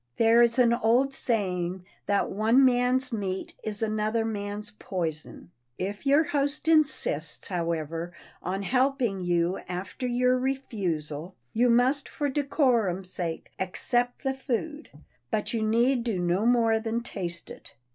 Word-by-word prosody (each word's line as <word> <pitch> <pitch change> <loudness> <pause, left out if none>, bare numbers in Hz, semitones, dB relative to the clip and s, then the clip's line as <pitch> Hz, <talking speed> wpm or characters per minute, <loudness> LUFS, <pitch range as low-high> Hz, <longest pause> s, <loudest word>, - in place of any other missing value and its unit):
There 230 +1 +5
is 235 +1 +3
an 240 -2 +5
old 240 +4 +2
saying 185 -7 -1 0.2
that 200 0 +1
one 225 +7 +4
man's 250 0 +2
meat 190 -3 -3
is 215 0 -3
another 215 +1 0
man's 205 -1 -4
poison. 165 -2 -5 0.3
If 200 +7 -4
your 285 +3 +5
host 290 0 -1
insists, 295 - +1
however, 165 -1 -2 0.3
on 190 +3 -3
helping 255 -3 +1
you 175 +1 +1
after 185 +8 -4
your 250 +1 +2
refusal, 185 - -3 0.2
you 240 +2 +3
must 255 +4 +2
for 290 -2 -2
decorum's 240 - +1
sake 165 -3 -4
accept 240 +6 -1
the 270 -1 0
food 270 +4 -4 0.4
but 215 0 -1
you 230 - 0
need 235 +3 +2
do 230 -5 -1
no 180 +5 +1
more 230 -2 +3
than 225 +1 -2
taste 175 -7 -4
it. - - -12
225 Hz, 135 wpm, -27 LUFS, 185-250 Hz, 0.4 s, There